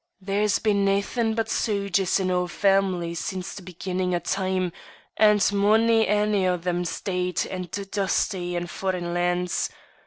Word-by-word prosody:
There's 200 +1 +1
been 205 -2 +1
naethin' 205 +3 +1
but 225 -1 0
sogers 200 -4 0
in 185 -1 0
oor 180 0 +1
family 190 -2 +1
since 185 +2 -4
the 200 - -8
be 180 -1 -11
ginnin' 180 0 -1
o' - - 0
time, 185 0 -1 0.4
and 210 -1 +5
mony 220 +3 +4
ane 210 -1 +2
o' 180 0 +1
them's 175 0 -2
deid 180 -2 -1
and 185 -2 -5 0.2
dusty 190 -2 -1
in 175 0 -2
foreign 175 -1 -3
lands. 175 0 0
190 Hz, 150 wpm, -25 LUFS, 180-205 Hz, 0.4 s, and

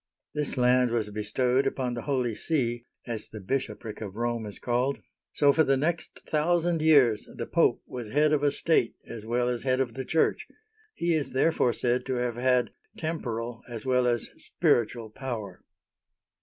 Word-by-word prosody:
This 150 -2 -2
land 125 0 +4
was 110 -3 -1
bestowed 125 +5 +1
upon 125 -2 -1
the 120 - -4
Holy 125 -4 0
See, 120 -3 -1
— - - -43
as 110 - -6
the 110 - -8
bishopric 110 0 -3
of 100 -2 -6
Rome 120 -1 -2
is 105 - -9
called, 125 +3 0 0.2
— - - -65
so 140 -1 +5
for 160 - +4
the 135 -2 +2
next 160 +4 -2
thousand 170 +1 +1
years 140 -9 +4
the - - -4
Pope - - +2
was 120 -4 -7
head 150 +2 +3
of 150 - +2
a 145 -1 +3
state, 145 -5 +1
as 110 -2 -8
well 120 +1 +1
as 125 -1 -1
head 130 -1 +1
of 125 -3 0
the 130 - -4
Church. 160 +5 +1 0.5
He 170 0 +1
is 150 -5 -1
therefore 130 -3 +2
said 125 +1 0
to 130 - 0
have 120 -1 -1
had 125 0 +2 0.3
temporal 120 -7 -3
as 115 -1 -6
well 125 -1 +3
as 120 -2 0 0.2
spiritual 115 -1 +1
power. 115 -5 -6
125 Hz, 185 wpm, -28 LUFS, 115-140 Hz, 0.5 s, so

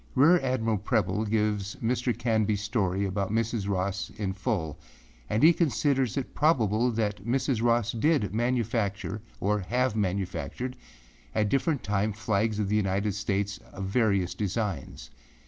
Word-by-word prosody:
Rear 165 +7 +6
Admiral 115 -6 0
Preble 105 -1 0
gives 105 -2 0
Mr. 125 +1 0
Canbyâs 110 -3 +1
story 100 -2 0
about 100 0 -2
Mrs. 115 -2 -1
Ross 95 0 -1
in 100 -3 -2
full, 95 - -2 0.5
and 110 +5 +1
he 165 +2 +8
considers 140 - +1
it 135 - -3
probable 120 -6 +2
that 105 -4 -2
Mrs. 125 0 0
Ross 120 -1 +2
did 115 - +1
manufacture 110 -4 -1 0.2
or 105 +2 +1
have 125 +4 0
manufactured 100 +5 -2 0.6
at 105 -1 +2
different 140 - +1
times 105 +1 0
flags 110 0 0
of 105 -2 0
the 105 - +1
United 100 0 +1
States 100 0 -2
of 95 0 -5
various 100 -3 +1
designs. 100 - -3
110 Hz, 140 wpm, -28 LUFS, 100-120 Hz, 0.6 s, he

